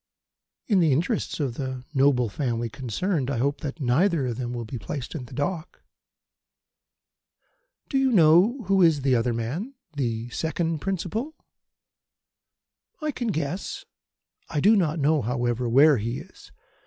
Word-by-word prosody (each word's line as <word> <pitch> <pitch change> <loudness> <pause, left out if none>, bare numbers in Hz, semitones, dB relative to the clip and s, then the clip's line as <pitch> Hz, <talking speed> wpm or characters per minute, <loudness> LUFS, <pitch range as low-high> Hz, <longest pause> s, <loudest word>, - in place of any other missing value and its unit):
"In 205 -5 +3
the 165 -4 +4
interests 170 - 0
of 135 -5 -1
the 130 -2 -4
noble 135 -3 +3
family 115 +1 -2
concerned, 135 - -2
I 140 - -1
hope 140 +4 0
that 150 +1 -5
neither 145 +4 +2
of 120 -2 -3
them 120 -2 -3
will 120 -1 -4
be 115 +2 -6
placed 125 +5 -5
in 145 -7 -5
the - - -13
dock." 155 +3 -4 2.0
"Do 270 - +1
you 265 -1 +2
know 190 - +5
who 195 0 +2
is 160 -5 +4
the 135 -2 +3
other 120 +1 +1
man 140 - -4 0.2
the 120 -5 -2
second 160 +3 -2
principal?" 195 - -3 1.6
"I 305 -2 -2
can 245 -3 -4
guess. 165 -2 -3 0.6
I 150 - -1
do 210 +9 +5
not 170 -5 +1
know, 150 0 +2
however, 120 +1 -1
where 140 +4 +6
he 115 +4 -3
is. - - -13
145 Hz, 150 wpm, -25 LUFS, 125-180 Hz, 2.0 s, where